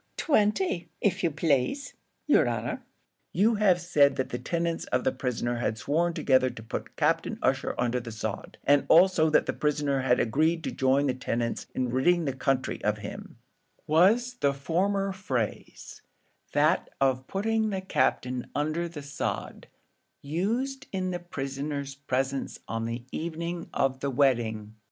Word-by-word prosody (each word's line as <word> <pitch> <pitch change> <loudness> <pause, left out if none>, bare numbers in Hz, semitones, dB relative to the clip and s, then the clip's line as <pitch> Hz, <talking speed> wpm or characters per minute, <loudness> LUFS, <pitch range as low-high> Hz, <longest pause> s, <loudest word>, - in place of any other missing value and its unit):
"Twenty, 210 - +1 0.2
av 195 -1 +2
you 170 - +2
plaze, 150 - 0 0.3
yer - - +4
honour." - - -2 0.5
"You 220 +4 +3
have 190 -4 +4
said 150 -5 +3
that 130 - -2
the 125 - -4
tenants 170 +4 -2
of 125 - 0
the - - +2
prisoner 120 -2 -2
had 120 -2 -1
sworn 165 +10 0
together 130 -1 +3
to 120 -3 -10
put 110 - -6
Captain - - +1
Ussher - - +1
under 125 0 0
the 115 -1 -8
sod, 110 -1 -5
and 145 0 +3
also 170 -2 +6
that 155 - +3
the - - -1
prisoner 145 -2 0
had 125 -1 +2
agreed 160 +8 +1
to - - -2
join 135 +2 +2
the 130 - +1
tenants 120 -2 -2
in 125 -1 0
ridding 165 +7 +3
the 135 - -1
country 130 0 -1
of - - +1
him; - - -8 0.5
was 225 +10 +3
the 140 -1 +2
former 195 +7 0
phrase, 130 - -4 0.5
that - - +2
of 130 -1 +1
putting 220 +2 0
the 195 -2 -2
Captain 130 -7 0
under 155 +4 -1
the 150 -4 -8
sod, 140 0 -4 0.6
used 225 - -2
in 185 -1 -2
the 175 - -3
prisoner's 140 -3 -4
presence 135 0 -2
on 115 0 -2
the 115 +1 -4
evening 170 +1 -4
of 135 -1 0
the 140 - -1
wedding?" 115 -6 +1
145 Hz, 155 wpm, -28 LUFS, 130-175 Hz, 0.6 s, also